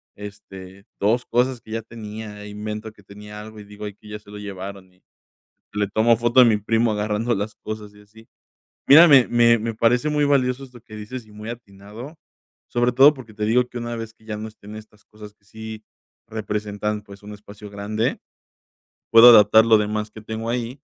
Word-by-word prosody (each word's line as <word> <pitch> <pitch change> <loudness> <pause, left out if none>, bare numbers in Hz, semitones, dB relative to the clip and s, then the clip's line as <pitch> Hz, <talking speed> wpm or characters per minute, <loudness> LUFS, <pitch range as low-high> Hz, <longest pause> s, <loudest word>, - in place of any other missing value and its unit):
este, 100 -1 -11
2 115 +5 +1
cosas 125 0 0
que 110 - -15
ya 115 +1 -3
tenía 110 -2 -9
e 105 - -9
invento 105 +1 -6
que 105 - -21
tenía 105 +1 -11
algo. 110 0 -11
Y 105 - -11
digo 105 +1 -10
ahí 105 - -6
que 105 - -19
ya 105 0 -7
se 105 -1 -18
lo 105 - -9
llevaron. 100 -1 -8
Y 90 - -32 0.7
le 105 -1 -1
tomo 110 +3 +3
foto 120 +3 +3
a - - +9
mi 115 -3 +4
primo 115 +2 +1
agarrando 105 +3 -1
las 105 +1 -4
cosas, 105 -1 -8
y 105 - -18
así. 110 +2 -19 0.6
Mira, 160 +5 +9
me 135 -4 +6
me 115 0 +4
me 115 +1 -3
parece 120 +6 +2
muy 150 -1 +1
valioso 135 -2 +1
esto 125 -3 -14
que 110 -1 -13
dices, 110 +3 -8
y 110 - -19
muy 105 +2 -9
atinado, 115 +5 -11 0.5
sobre 120 +1 +1
todo 135 +4 +7
porque 125 -6 -13
te 105 0 -3
digo 125 +3 +2
que - - -8
una 120 0 -5
vez 115 -1 -7
que 110 - -26
ya 110 -1 -5
no 110 - -6
estén 105 0 -13
estas 110 -1 -14
cosas 105 -1 -13
que 105 0 -38
sí 110 +1 -9 0.4
representan, 105 -1 -4
pues, 100 -1 -14
un 105 - -10
espacio 105 0 -12
grande, 105 +3 -3 0.9
puedo 115 +2 +9
adaptar 110 -1 +7
lo 115 -1 +5
demás 105 0 -2
que 110 - -12
tengo 110 +1 -5
ahí, 125 +3 -4
110 Hz, 205 wpm, -22 LUFS, 105-115 Hz, 0.9 s, a